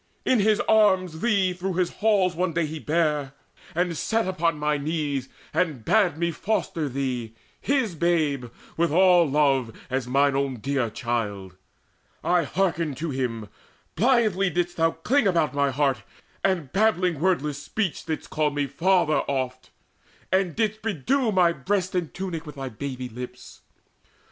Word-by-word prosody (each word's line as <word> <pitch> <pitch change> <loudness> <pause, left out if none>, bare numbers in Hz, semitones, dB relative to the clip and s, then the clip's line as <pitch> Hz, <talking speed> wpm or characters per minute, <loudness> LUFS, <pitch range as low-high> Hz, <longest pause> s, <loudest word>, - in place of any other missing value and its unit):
In 255 - +3
his 215 +1 +3
arms 190 -6 +3
Thee 200 -6 +2
through 185 +1 -3
his 180 -1 +1
halls 205 -4 +3
one 180 0 -1
day 165 0 +1
he 155 +1 -6
bare, 150 -3 0 0.4
and 175 0 0
set 225 +7 0
Upon 170 -4 0
my 150 0 0
knees, 145 -3 -2 0.2
and 150 -11 -1
bade 190 -8 +3
me 170 +1 0
foster 165 -5 -2
thee, 125 -4 -3 0.2
His 265 -9 0
babe, 155 -6 0 0.3
with 170 -1 +1
all 175 -1 +5
love, 135 -4 +2 0.2
as 130 -1 -1
mine 140 +2 +3
own 135 -1 0
dear 130 0 -1
child: 105 -5 -3 0.7
I 175 -2 +2
hearkened 165 -3 -1
to 160 +2 -3
him: 120 -5 -3 0.5
blithely 215 -6 +3
didst 175 0 -2
thou 165 0 +4
cling 220 +10 +1
About 170 -6 +2
mine 140 -1 +1
heart, 135 -4 +1 0.4
and, 175 -8 0
babbling 185 -6 +2
wordless 150 -5 0
speech, 195 +3 -2
Didst 160 - -4
call 155 -1 +1
me 145 0 -1
`father' 170 +2 +2
oft, 130 -2 -3 0.6
and 185 -3 +1
didst 220 -1 -1
bedew 225 - 0
My 180 -3 +4
breast 185 +6 -1
and 175 -4 -1
tunic 170 -4 -5
with 150 - -8
thy 135 -1 -5
baby 130 +1 -5
lips. 125 +1 -9
165 Hz, 155 wpm, -25 LUFS, 140-185 Hz, 0.7 s, all